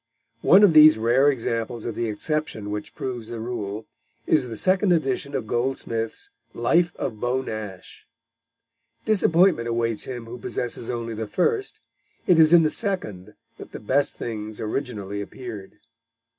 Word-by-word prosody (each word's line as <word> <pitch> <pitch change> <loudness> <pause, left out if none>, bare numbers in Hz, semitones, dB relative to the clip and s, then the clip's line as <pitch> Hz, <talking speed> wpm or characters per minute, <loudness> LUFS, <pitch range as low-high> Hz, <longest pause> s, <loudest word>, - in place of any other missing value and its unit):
One 195 +3 +6
of 195 -5 +6
these 155 -2 +8
rare 120 +6 +3
examples 115 -2 -2
of 115 - -3
the 115 +1 -2
exception 110 -3 -3
which 105 0 -6
proves 120 -4 -5
the 115 - -6
rule 110 -2 -5 0.4
is 140 -5 +2
the 115 -2 -6
second 190 - +2
edition 140 -3 0
of - - -2
Goldsmith's 115 -1 -3 0.2
Life 170 +9 +2
of 110 - -4
Beau 125 +3 -1
Nash. 105 -6 -8 1.0
Disappointment 180 - +3
awaits 115 -1 -1
him 120 -3 -6
who 120 +2 -9
possesses 120 0 -4
only 115 -1 -3
the 110 0 -4
first; 395 - -1 0.4
it 175 -3 +4
is 160 0 +6
in 170 -1 +7
the 155 - +2
second 105 - -4 0.2
that - - -11
the - - -6
best 130 +7 0
things 110 -2 -6
originally 105 -4 -4
appeared. 105 -3 -8
120 Hz, 150 wpm, -24 LUFS, 110-150 Hz, 1.0 s, these